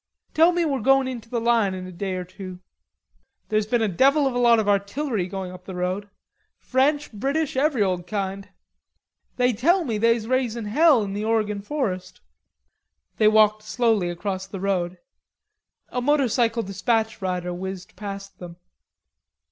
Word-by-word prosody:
"Tell 330 +3 +5
me 345 -1 0
we're 275 -4 0
going 270 +3 +3
into 235 -3 -6
the 235 - -1
line 230 -4 +2
in 185 0 -6
a 185 - -8
day 185 +1 -4
or 180 - -3
two." 185 0 -9 0.9
"There's 215 -1 +1
been 235 0 +1
a - - +2
devil 275 - +3
of 265 - 0
a 245 - -1
lot 235 -1 +5
of 215 -2 0
artillery 205 +1 0
going 185 -1 -5
up 180 0 -12
the 190 - -7
road; 185 +3 -2 0.5
French, 285 +1 0
British, 275 +8 -1
every 270 -4 +2
old 180 -2 -2
kind." 195 -1 -4 0.9
"Tell 250 - +3
me 225 -5 -2
they's 230 0 +2
raisin' 240 -3 -1
hell 280 +2 +4
in 195 -1 -4
the 205 +1 -3
Oregon 215 -2 0
forest." 200 -7 -3 1.0
They 215 - +4
walked 215 0 +4
slowly 215 -4 +1
across 190 +2 -4
the 195 0 -7
road. 185 -2 -1 0.9
A 250 - -2
motorcycle 245 -4 +2
despatch 220 +3 -1
rider 180 -1 -2
whizzed 185 0 -7
past 195 -1 -8
them. 175 -1 -9
215 Hz, 160 wpm, -24 LUFS, 190-250 Hz, 1.0 s, Tell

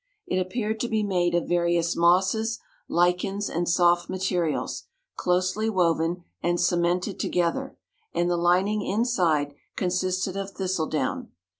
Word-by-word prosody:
It 185 - 0
appeared 215 +4 -2
to 240 - -1
be 220 -2 0
made 175 -3 +1
of 175 - 0
various 170 -1 +1
mosses, 190 +6 +2 0.3
lichens, 180 +3 +1
and 175 +1 -1
soft 175 0 +3
materials, 180 -4 -1 0.3
closely 185 +5 0
woven 170 -2 +1 0.2
and 175 0 0
cemented 175 +2 +1
together, 180 +11 -1 0.3
and 175 - 0
the 175 - +1
lining 185 +5 +2
inside 180 - +1 0.2
consisted 185 0 -1
of 195 0 -4
thistle 185 -4 -1
down. 140 -4 -2
180 Hz, 130 wpm, -26 LUFS, 175-195 Hz, 0.3 s, soft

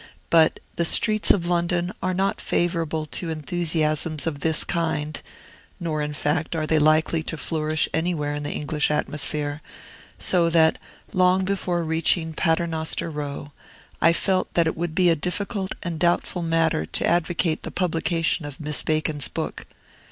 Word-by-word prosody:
But 160 -1 +5 0.2
the 170 - +2
streets 215 +5 +3
of 175 -4 +4
London 175 +1 0
are 185 0 -1
not 195 +2 0
favorable 165 -3 -1
to 165 +2 -4
enthusiasms 155 -1 0
of 155 -4 -2
this 160 +2 +1
kind, 160 -3 -2 0.6
nor, 155 -3 -2
in 150 0 -3
fact, 155 +3 -1
are 155 -1 -1
they 155 0 +2
likely 155 +2 +3
to 160 +1 -4
flourish 155 0 0
anywhere 160 -3 -1
in 145 - -3
the 145 - -4
English 150 0 0
atmosphere; 150 0 -2 0.6
so 170 -2 +3
that, 160 -1 +4 0.3
long 185 +1 +3
before 185 -3 -1
reaching 160 0 +1
Paternoster 165 0 0
Row, 145 -1 -5 0.5
I 165 - +6
felt 185 +2 0
that 170 - +4
it 160 - -1
would 170 -1 -3
be 180 -1 +4
a - - +3
difficult 190 +4 -3
and 170 -2 -4
doubtful 175 0 +1
matter 165 - +1
to 85 - -1
advocate 170 -1 +1
the - - -6
publication 165 -2 0
of 145 -2 -8
Miss 150 -3 -1
Bacon's 155 -2 0
book. - - -5
165 Hz, 155 wpm, -24 LUFS, 155-175 Hz, 0.6 s, I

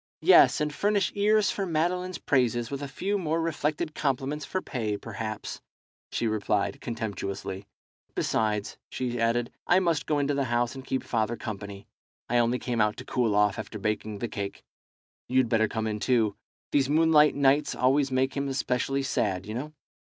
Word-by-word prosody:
"Yes, - - +7
and 150 -1 -1
furnish 205 +6 +1
ears 210 0 +3
for 200 - -2
Madeline's 180 +2 -1
praises, 120 -3 +1
with 140 0 -4
a 140 - -3
few 200 +8 -2
more 165 -2 0
reflected 155 0 -1
compliments 140 +1 -1
for 185 - -2
pay, 110 - -3
perhaps," 110 0 -6 0.5
she - - -1
replied, 110 +3 0
contemptuously. 100 -4 -4 0.5
"Besides," 105 -2 -1
she 120 -2 -3
added, 115 +1 +1 0.2
"I 180 - +5
must 165 -5 0
go 150 - +1
into 145 0 +1
the 140 -1 0
house 120 0 0
and 135 -1 -8
keep 130 -1 -2
father 115 0 0
company. 100 -2 -7 0.4
I 120 +1 +2
only 120 +1 +2
came 120 -2 -1
out 105 0 +1
to - - -8
cool 115 -5 +1
off 105 -1 +3
after 110 - -6
baking 105 0 -2
the 120 - -3
cake. 100 -2 -5 0.6
You'd 130 -2 +2
better 110 -1 +3
come 110 +1 -3
in 105 -1 -2
too. 110 -3 +2 0.4
These 135 -2 +2
moonlight 155 -1 +5
nights 140 +1 +3
always 135 +2 +3
make 130 +1 +1
him 140 -1 -1
specially 135 +1 0
sad, 95 -7 -1
you 105 - -6
know." 140 +6 -4
125 Hz, 175 wpm, -27 LUFS, 110-150 Hz, 0.6 s, Yes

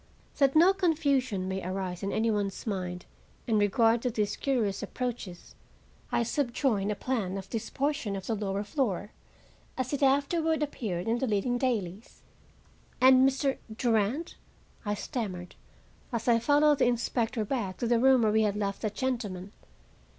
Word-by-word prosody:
That 275 0 +4
no 350 +5 +7
confusion 280 - +1
may 190 0 -3
arise 185 -1 -4
in 195 - -2
any 225 +1 +1
one's 205 -2 -2
mind 180 -4 -4 0.4
in 220 -3 +2
regard 225 +3 +3
to 250 - 0
these 215 -3 -1
curious 225 -8 -1
approaches, 235 -8 -5 0.6
I - - +2
subjoin 240 -5 0
a 210 - 0
plan 205 -8 -2
of 190 -1 -7
this 225 - -3
portion 275 -8 -1
of 190 -1 -6
the 230 - -1
lower 200 -1 -2
floor 210 - -2 0.7
as 255 +1 -2
it 285 - -1
afterward 300 +4 +2
appeared 205 -11 -3
in 230 +2 +1
the 265 - 0
leading 230 +3 0
dailies. 215 -6 -3 0.8
"And 260 +1 +7
Mr. 270 0 -1 0.2
Durand?" 235 +6 0 0.5
I 205 0 0
stammered, 195 -7 -5 0.6
as 235 -1 -3
I 235 -1 +5
followed 290 +3 +4
the 255 - +4
inspector 235 -1 0
back 200 -6 -3
to - - -2
the 235 0 +3
room 260 -1 +5
where 215 - +3
we 220 +1 +3
had 210 -2 +1
left 200 -1 -2
that 210 -2 -3
gentleman. 210 -8 -3
230 Hz, 160 wpm, -29 LUFS, 200-265 Hz, 0.8 s, no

